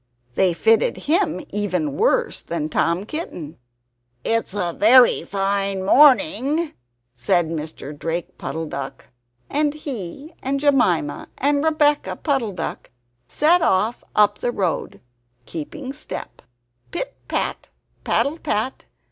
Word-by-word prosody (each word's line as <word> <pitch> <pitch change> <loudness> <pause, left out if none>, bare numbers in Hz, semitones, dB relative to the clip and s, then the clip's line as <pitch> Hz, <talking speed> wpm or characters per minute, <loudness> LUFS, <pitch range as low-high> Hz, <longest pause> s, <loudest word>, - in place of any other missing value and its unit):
They 185 +5 +3
fitted 225 +6 +3
him 320 - 0
even 180 -8 -1
worse - - +1
than 155 -2 -3
Tom 170 +5 0
Kitten. 180 - -6 0.6
"It's 225 -3 0
a 175 -4 -1
very 240 +6 +6
fine 195 -1 -1
morning!" 295 - +4 0.4
said 155 +7 +1
Mr. 155 -2 -6
Drake 165 +3 -4
Puddle 160 0 -4
duck. 140 -3 -7 0.4
And 295 0 0
he 275 - -7
and 275 +1 -1
Jemima 245 - +2
and 285 +1 +1
Rebeccah 300 -2 +1
Puddle 265 -9 0
duck - - -5 0.4
set 335 - +3
off 220 -3 +1
up 205 -1 +4
the 240 - -1
road, 190 -7 -2 0.4
keeping 255 - -6
step 300 - -8 0.5
pit - - -4
pat, - - -2 0.4
paddle 310 +4 +1
pat! 255 -3 -2
210 Hz, 115 wpm, -22 LUFS, 170-285 Hz, 0.6 s, very